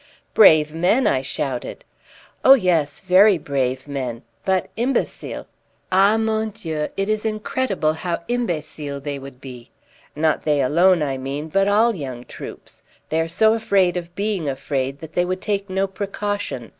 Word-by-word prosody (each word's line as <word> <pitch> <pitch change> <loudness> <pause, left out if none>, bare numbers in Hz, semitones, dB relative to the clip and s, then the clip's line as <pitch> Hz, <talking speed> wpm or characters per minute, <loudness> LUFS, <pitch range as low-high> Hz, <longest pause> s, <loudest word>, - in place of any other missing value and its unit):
"Brave 155 -7 +6
men!" 185 +11 +2
I 130 - +2
shouted. 130 -1 -4 0.6
"Oh 270 - +9
yes, 170 - 0
very 190 +1 +5
brave 135 -3 -2
men, 130 -5 -4 0.2
but 190 -2 +1
imbecile. 245 +3 -2 0.5
Ah, 195 +4 +4
mon 220 0 0
Dieu, 160 -8 -4
it 195 0 0
is 215 0 0
incredible 215 -6 -1
how 170 +1 -4
imbecile 155 -11 -3
they 140 0 -5
would 135 -1 -11
be! 125 -3 -11 0.5
Not 155 +1 +1
they 150 -2 +1
alone, 170 +5 +4
I 135 -2 -2
mean, 140 +4 -5
but 195 +4 +2
all 220 +3 +3
young 130 -7 -6
troops. - - -10 0.3
They 160 +1 +1
are 165 - -1
so 220 +6 +3
afraid 195 -5 +2
of 175 0 -6
being 200 -6 -1
afraid 135 0 -3
that 160 -1 -10
they 175 - +2
would 185 +1 -2
take 200 0 -2
no 190 +1 0
precaution. 200 - -4
175 Hz, 155 wpm, -21 LUFS, 140-205 Hz, 0.6 s, Oh